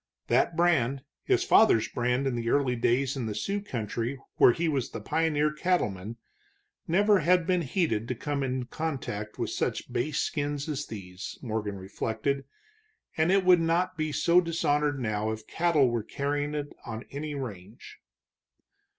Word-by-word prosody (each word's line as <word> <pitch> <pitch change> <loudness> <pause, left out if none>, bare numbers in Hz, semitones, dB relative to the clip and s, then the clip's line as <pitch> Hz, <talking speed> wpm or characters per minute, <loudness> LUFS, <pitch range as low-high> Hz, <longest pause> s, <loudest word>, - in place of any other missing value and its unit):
That 165 - +3
brand, 140 -6 +2 0.2
his 380 -1 +3
father's 220 - +5
brand 125 +2 0
in 135 - 0
the 115 -1 -2
early 135 -2 +2
days 125 +3 +1
in 125 -4 -3
the 105 - -4
Sioux 200 - -2
country 120 - -3 0.2
where - - +7
he 165 +7 -1
was 140 -5 0
the 115 - -6
pioneer 150 +4 +1
cattleman, 115 - -1 0.7
never 205 +4 +4
had 180 +2 +3
been 180 -1 +2
heated 130 - 0
to 125 - -2
come 145 +4 -3
in 130 -1 -2
contact 125 -8 -4
with - - -2
such - - -2
base 150 +4 -1
skins 145 -1 -1
as 145 -2 -3
these, 95 -3 -8
Morgan 110 -4 -3
reflected, 110 +8 -3 0.7
and 160 +3 +2
it 195 -1 +3
would 180 -2 +6
not 165 +2 +1
be 155 -1 -2
so 170 +4 +4
dishonored 150 -4 0
now 110 -2 -1
if 110 0 -6
cattle 160 -5 +2
were 120 -1 0
carrying 145 +5 -2
it 145 -1 -4
on 115 0 -6
any 145 +1 -4
range. 105 -6 -8
140 Hz, 160 wpm, -28 LUFS, 115-160 Hz, 0.7 s, where